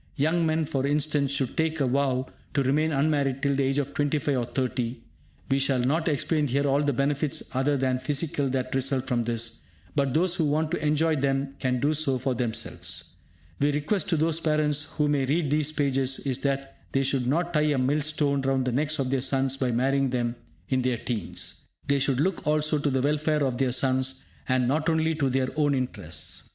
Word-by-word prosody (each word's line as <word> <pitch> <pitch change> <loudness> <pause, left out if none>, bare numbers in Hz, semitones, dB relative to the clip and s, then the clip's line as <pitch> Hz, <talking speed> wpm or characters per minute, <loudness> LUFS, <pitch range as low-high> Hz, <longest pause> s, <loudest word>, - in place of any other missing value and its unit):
Young 160 +3 +2
men, 160 0 +1
for 135 -1 -1
instance, 145 -1 +1
should 140 -2 -1
take 160 0 0
a 140 - +2
vow 130 0 +1 0.3
to 140 - +3
remain 150 +4 +2
unmarried 140 -2 +1
till 140 -1 +2
the 140 - +1
age 135 +1 +1
of 140 -1 -1
25 145 0 0
or 125 -2 0
30. 125 -1 -2 0.5
We 135 - +3
shall 135 -1 +2
not 140 +7 +1
explain 150 0 +1
here 140 +3 0
all 140 +1 +2
the 145 -1 +1
benefits 140 +2 0
other 135 +3 +1
than 130 -1 0
physical 140 +1 -1
that 130 -1 -2
result 135 0 0
from 120 -3 0
this; 115 0 -2 0.4
but 140 -3 +1
those 175 +2 +3
who 165 -3 +1
want 155 +2 0
to 175 - -2
enjoy 155 +1 +2
them 135 0 0
can 125 -1 0
do 145 +4 +2
so 145 -4 +1
for 130 +1 -1
themselves. 120 -2 -4 0.5
My 145 - +3
request 150 +8 0
to 165 - +2
those 160 +1 +1
parents 150 -2 +1
who 150 -1 -1
may 140 -3 +1
read 150 0 +1
these 150 0 +1
pages 135 -3 0
is 130 -3 -2
that 135 -1 -2 0.2
they 135 - +2
should 135 -2 +1
not 170 +6 0
tie 150 - +3
a 150 -2 +2
mill 135 +4 +1
stone 145 -2 +1
round 135 -1 +1
the 130 - 0
necks 150 +5 0
of 135 -3 -1
their 135 -1 +1
sons 135 0 +1
by 130 -2 -1
marrying 135 +3 +1
them 120 -1 -1 0.3
in 130 -1 +1
their 125 -1 0
teens. 110 -5 -4 0.3
They 140 0 +2
should 135 -1 +1
look 165 0 0
also 150 0 +2
to 145 - 0
the 130 -1 +1
welfare 150 +1 +1
of 130 -2 -2
their 130 -2 +2
sons, 130 +1 +1 0.2
and 130 -1 +2
not 155 +4 +1
only 160 0 +2
to 145 -4 0
their 130 0 0
own 145 -2 +3
interests. 125 -10 -4
140 Hz, 210 wpm, -26 LUFS, 130-150 Hz, 0.5 s, to